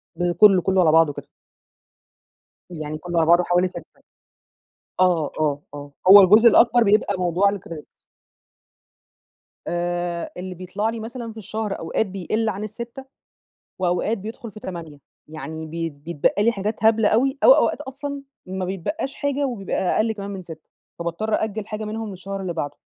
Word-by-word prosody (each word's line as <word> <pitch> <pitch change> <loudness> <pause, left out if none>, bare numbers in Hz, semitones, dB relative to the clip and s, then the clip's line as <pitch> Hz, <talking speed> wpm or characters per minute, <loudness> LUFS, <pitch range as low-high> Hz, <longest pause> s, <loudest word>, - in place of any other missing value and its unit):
ب 175 0 0
كلّه، 190 +1 +6
كلّه 190 +1 +2
على 160 - +4
بعضُه 160 -2 +4
كده. - - -9 1.4
يعني 155 -3 -6
كلّه 175 +2 -5
على 160 - +2
بعضه 175 +1 +5
حوالي 180 +1 +2
6 - - -8 1.2
آه، 175 -5 +2
آه، 145 -1 0
آه 145 0 -9 0.2
هو 200 +1 +11
الجزء 210 +5 +7
الأكبر 240 +2 +5
بيبقى 205 0 +2
الموضوع 180 +2 +2
الcredit. 180 -6 -7 1.8
آآ، 175 0 -2
اللي 185 0 -6
بيطلع 185 +5 -3
لي 225 0 -5
مثلًا 230 +1 -7
في 220 - -14
الشهر 215 0 -4
أوقات 165 +6 -1
بيقل 200 +3 -2
عن 205 +1 -4
ال6 235 +5 -8 0.7
وأوقات 185 +4 0
بيدخل 225 +4 -8
في 215 - -11
8 165 -5 -8 0.3
يعني 160 0 -7
بيت 165 0 -4
بيتبقى 160 +6 -1
لي 230 +2 +3
حاجات 215 +1 -4
هبلة 220 -1 +4
أوي، 265 +5 +1
أو - - +9
أوقات - - +1
أصلًا 280 +1 -6 0.2
ما 185 0 -4
بيتبقّاش 195 - -4
حاجة 285 0 -1
وبيبقى 215 -7 -4 0.2
أقل 220 +1 +2
كمان 200 -1 -7
من 195 -2 -6
6 160 -3 -12 0.3
فباضطّر 170 +6 -2
أأجل 220 -1 -2
حاجة 215 0 -5
منهم 215 0 -5
للشهر 195 +1 -6
اللي 185 -2 -3
بعدُه. 155 -3 -4
195 Hz, 160 wpm, -22 LUFS, 170-220 Hz, 1.8 s, هو